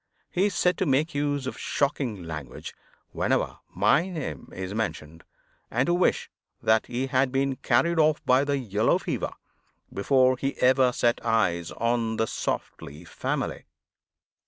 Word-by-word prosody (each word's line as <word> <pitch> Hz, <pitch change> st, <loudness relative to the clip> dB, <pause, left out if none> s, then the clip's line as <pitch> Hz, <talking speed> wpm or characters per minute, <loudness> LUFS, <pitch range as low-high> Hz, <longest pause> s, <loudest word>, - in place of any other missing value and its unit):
He 190 Hz, +3 st, +2 dB
is 205 Hz, -, -4 dB
said 180 Hz, 0 st, +2 dB
to 190 Hz, -, +1 dB
make 145 Hz, +5 st, +1 dB
use 145 Hz, -1 st, -1 dB
of 130 Hz, -, -5 dB
shocking 135 Hz, -9 st, -1 dB
language 75 Hz, -5 st, -7 dB, 0.4 s
whenever -, -, 0 dB
my 135 Hz, -, +2 dB
name 145 Hz, -, -6 dB
is 95 Hz, +1 st, -5 dB
mentioned, 80 Hz, -7 st, -4 dB, 0.5 s
and 125 Hz, +4 st, +1 dB
to 175 Hz, -, +1 dB
wish 180 Hz, +1 st, +2 dB, 0.3 s
that 110 Hz, 0 st, +2 dB
he 125 Hz, +2 st, -2 dB
had 130 Hz, -1 st, +1 dB
been 135 Hz, 0 st, 0 dB
carried 170 Hz, -1 st, +2 dB
off 155 Hz, -1 st, +4 dB
by 130 Hz, +2 st, +4 dB
the 145 Hz, 0 st, 0 dB
yellow 110 Hz, -4 st, +1 dB
fever -, -, -3 dB, 0.6 s
before 130 Hz, +5 st, +3 dB
he 135 Hz, +2 st, -3 dB
ever 130 Hz, 0 st, +4 dB
set 120 Hz, -1 st, +1 dB
eyes 100 Hz, -7 st, +1 dB
on 115 Hz, -1 st, -1 dB
the 110 Hz, -, +2 dB
Softly 75 Hz, -6 st, -5 dB
family. -, -, -3 dB
130 Hz, 150 wpm, -26 LUFS, 105-140 Hz, 0.6 s, off